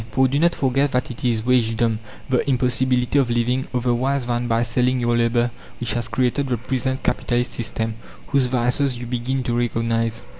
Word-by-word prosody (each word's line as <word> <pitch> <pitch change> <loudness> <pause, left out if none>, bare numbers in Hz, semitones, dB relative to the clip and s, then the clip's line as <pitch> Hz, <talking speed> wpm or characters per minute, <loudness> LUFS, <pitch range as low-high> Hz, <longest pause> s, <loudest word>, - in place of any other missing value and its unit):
For, 130 0 +4
do 140 +3 0
not 170 +1 +3
forget 135 +1 +1
that 125 0 0
it 120 - -6
is 115 -3 +1
wagedom, 115 -2 +2 0.3
the 130 +2 0
impossibility 125 +1 +2
of 130 -3 +1
living 120 +2 0
otherwise 125 +2 0
than 120 0 -1
by 115 0 +2
selling 125 +2 +1
your 120 -1 +1
labour, 120 +1 +2 0.3
which 120 -3 -1
has 120 -1 -2
created 125 +4 0
the 125 -2 0
present 130 +2 -2
Capitalist 120 0 0
system, 110 -1 -2 0.3
whose 140 -3 +2
vices 125 +1 +1
you 120 - -6
begin 125 +2 -2
to 120 -1 -1
recognize." 115 -1 -1
125 Hz, 180 wpm, -22 LUFS, 120-130 Hz, 0.3 s, For